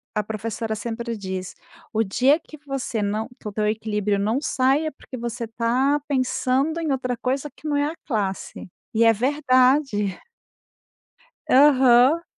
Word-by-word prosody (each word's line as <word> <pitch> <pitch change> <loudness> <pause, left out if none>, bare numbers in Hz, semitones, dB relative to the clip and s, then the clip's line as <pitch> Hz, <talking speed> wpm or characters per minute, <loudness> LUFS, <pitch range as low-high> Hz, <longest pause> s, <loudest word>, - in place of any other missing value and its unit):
a 210 - +1
professora 220 +1 -4
sempre 235 +2 -4
diz: 190 -2 -5 0.4
"O 220 +1 +2
dia 255 - +3
que 305 - -13
você 265 -5 -3
não 210 +3 -2
que - - -8
o - - -4
teu 210 +1 0
equilíbrio 210 -1 -1
não 220 +7 0
saia, 285 +2 +1
porque 270 - -11
você 235 0 -4
tá 250 +6 +1
pensando 270 +3 0
em 315 -3 -1
outra 255 -2 -1
coisa 265 +4 -2
que 310 - -9
não 290 -1 +1
é 285 - +2
a 305 - -2
classe". 200 -8 -3 0.3
E 225 - +4
é 225 - +6
verdade. 255 -4 +2 1.3
Aham. 265 +2 +5
245 Hz, 150 wpm, -23 LUFS, 215-275 Hz, 1.3 s, é